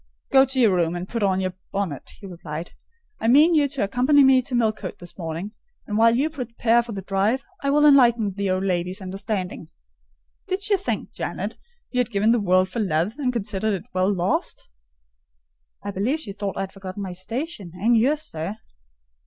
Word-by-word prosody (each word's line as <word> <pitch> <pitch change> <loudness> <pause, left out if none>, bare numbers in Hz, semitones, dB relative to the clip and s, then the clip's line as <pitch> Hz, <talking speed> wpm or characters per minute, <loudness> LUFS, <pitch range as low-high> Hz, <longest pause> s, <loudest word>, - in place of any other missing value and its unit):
"Go 270 0 +7
to 265 0 -2
your 225 -6 +5
room, 170 -1 +1
and 175 +1 -5
put 230 +1 -3
on 190 -2 +2
your 185 -1 -2 0.2
bonnet," 190 -9 -4
he 205 - -11
replied. 170 -3 -7 0.5
"I - - -1
mean 295 +8 +6
you 295 -3 +4
to 280 -3 -2
accompany 255 +8 +4
me 265 -1 +6
to 255 0 -4
Millcote 215 -5 -1
this 175 -1 -10
morning; 170 +3 -5 0.3
and 210 - -4
while 230 +1 +5
you 275 +5 +2
prepare 240 -4 +1
for 235 0 -8
the 195 -3 -5
drive, 200 +7 0 0.2
I 280 - 0
will 295 +1 +4
enlighten 240 -8 +5
the 200 0 -2
old 185 +1 0
lady's 180 0 -1
understanding. 190 -3 -4 0.8
Did 380 +1 -2
she 410 0 +3
think, 390 0 -3
Janet, - - -4 0.4
you 250 - -1
had 250 - +1
given 215 0 +2
the 240 - +3
world 185 -1 +3
for 230 - -5
love, 180 0 0
and 255 -3 +1
considered 210 -2 -1
it 185 - -6
well 185 +2 +2
lost?" 185 -1 -1 1.1
"I 205 - -3
believe 225 +11 -1
she 220 -10 -6
thought 200 -1 -4
I - - -1
had 195 0 -5
forgotten 195 +1 -7
my 185 -2 -5
station, 215 - -5
and 225 +6 +2
yours, 285 +7 +2
sir." 165 - -5
205 Hz, 195 wpm, -23 LUFS, 185-250 Hz, 1.1 s, Go